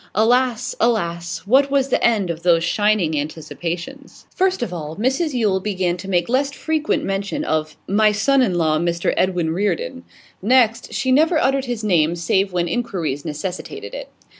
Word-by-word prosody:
Alas! 240 +2 +2
alas! 170 -7 -1
What 270 +6 +4
was 275 -1 +1
the - - +1
end 210 -7 +2
of 165 0 -7
those 170 -1 +3
shining 190 -4 +1
anticipations? 170 - -6
First 375 -6 +1
of 190 - -4
all, 155 -2 -6
Mrs 265 - 0
Yule 210 -6 +1
began 185 -3 -1
to 190 - -9
make 175 -2 +1
less 275 +3 +1
frequent 310 +1 -1
mention 195 +9 -2
of 155 - -2
'my 210 +2 +3
son 265 +6 +2
in 200 -8 +1
law, 155 -2 +2
Mr 170 0 0
Edwin 180 -3 0
Reardon.' 170 - -2 0.4
Next, 230 +1 +2
she 260 - -1
never 315 +5 +4
uttered 270 -2 +1
his 240 -3 -4
name 170 -5 +2
save 190 +3 0
when 175 -1 0
inquiries 165 - -2
necessitated 180 - -6
it. - - -7
200 Hz, 165 wpm, -20 LUFS, 170-255 Hz, 0.4 s, What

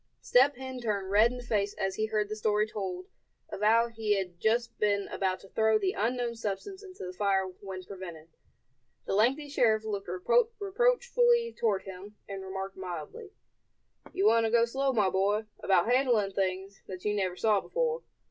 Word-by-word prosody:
Step 265 +3 +4
Hen 260 0 -7
turned 200 -4 -2
red 215 +3 +6
in 250 - -6
the 245 - -8
face 205 -4 -1
as 195 0 -1
he 215 +3 -1
heard 215 -1 0
the 215 - -4
story 210 0 +1
told 185 -4 -5 0.4
of - - -7
how 230 +2 +4
he 220 -3 -1
had 180 -3 -4
just 235 +4 +1
been 200 -1 +1
about 185 -1 -1
to - - -15
throw 220 0 +3
the 195 -3 0
unknown 240 +2 -1
substance 225 - -5
into 370 - -9
the 180 - -6
fire 195 0 +1
when 185 0 -8
prevented. 175 -4 -9 0.8
The - - -2
lengthy 255 +9 +2
sheriff 220 -6 +2
looked 200 -3 -4 0.5
reproachfully 480 +2 +2
toward 205 -4 0
him, 195 +2 -10
and 195 -1 -6
remarked, 190 0 -6
mildly: 185 - -7 0.8
"You 195 - 0
want 225 +1 +4
to - - -3
go 235 0 +4
slow, 270 +3 0
my 210 -6 +2
boy, 205 +3 +1
about 190 -2 +3
handling 245 -5 +2
things 190 +1 -3
that 185 0 -8
you 210 - +1
never 190 -3 -1
saw 210 0 +2
before. 485 -1 -1
210 Hz, 180 wpm, -29 LUFS, 195-240 Hz, 0.8 s, red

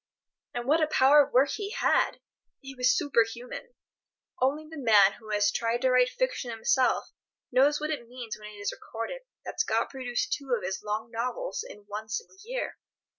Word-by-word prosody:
And 240 0 -3
what 315 +3 +4
a 310 - +3
power 290 0 +6
of - - -9
work 270 +3 +4
he 405 -2 -3
had! 435 - +1 0.4
It 270 0 -9
was 250 0 +3
superhuman. 250 - -1 0.7
Only 295 +4 +1
the 320 - -10
man 210 -5 +6
who 220 -2 -13
has 205 -1 +2
tried 235 +2 -1
to 260 - +4
write 250 0 +5
fiction - - -2
himself 235 +3 +1 0.4
knows 275 +4 +4
what 305 +1 -2
it 260 -6 -4
means 240 -2 -6
when 210 0 -10
it - - -12
is 205 - -2
recorded 230 - -6 0.2
that - - -7
Scott - - +1
produced 250 -3 -2
two 270 -3 -1
of - - -8
his 190 +1 -3
long 215 +2 -3
novels 250 - -3
in 350 - -11
one 210 +1 -6
single 225 - -5
year. - - -4
250 Hz, 185 wpm, -28 LUFS, 225-295 Hz, 0.7 s, power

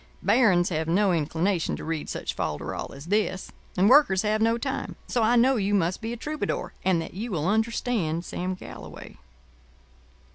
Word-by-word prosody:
Barons 185 -8 +4
have 160 -2 -2
no 190 +3 +3
inclination 165 +3 0
to - - -8
read 160 -2 -3
such - - -4
folderol 75 -1 -4
as 140 +2 -10
this; 200 0 -1 0.3
and 190 +3 +4
Workers 235 -7 +5
have 215 +1 +1
no 230 +1 +3
time: 265 +2 -4
so 245 - 0
I 225 +2 +4
know 255 +2 +4
you 205 0 +1
must 180 0 0
be 225 +1 -4
a 240 - -4
Troubadour, 305 +5 -3
and 185 -3 +2
that 165 - -6
you 215 +6 -5
will 165 -5 -1
understand 220 -6 0
Sam 185 +1 -3
Galloway. - - -10
195 Hz, 175 wpm, -26 LUFS, 170-230 Hz, 0.3 s, Workers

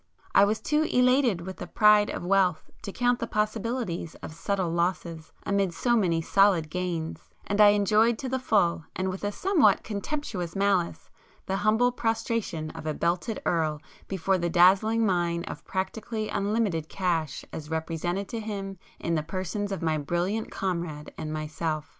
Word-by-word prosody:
I 200 - +7
was 215 +2 0
too 300 0 +1
elated 250 -6 +3
with 190 +2 -7
the - - -7
pride 210 -1 +5
of - - -4
wealth 185 -3 +2
to 200 - -6
count 245 +3 +1
the - - -3
possibilities 215 -5 -2
of - - -6
subtle 185 0 -1
losses 170 -2 -2
amid 195 -4 0
so 240 +5 +2
many 170 -7 +1
solid 185 -5 +3
gains; 175 -3 -4 0.2
and 205 +1 +1
I 210 - +9
enjoyed 210 +3 +4
to 265 - -5
the 260 +1 -1
full 180 - +1
and 190 0 -1
with 185 +2 -6
a 205 - 0
somewhat 365 - +3
contemptuous 205 - -4
malice 195 -3 0 0.3
the 190 - -1
humble 220 +4 +3
prostration 225 -9 -2
of 155 - -8
a 155 - -1
'belted 180 +6 -1
Earl' 155 -3 0 0.3
before 190 0 0
the 170 0 0
dazzling 195 +6 +4
mine 175 -3 0
of - - -7
practically 215 +3 -3
unlimited 200 -6 -1
cash 165 -6 -1
as 150 -1 -7
represented 165 +4 -2
to 230 - -4
him 195 -3 -5 0.2
in 170 - -2
the 155 - +1
persons 185 +5 -4
of 190 -3 -3
my 160 -1 +1
brilliant 175 +9 -1
comrade 170 -5 -4
and 155 - -5
myself. 155 0 -3
190 Hz, 165 wpm, -27 LUFS, 170-215 Hz, 0.3 s, I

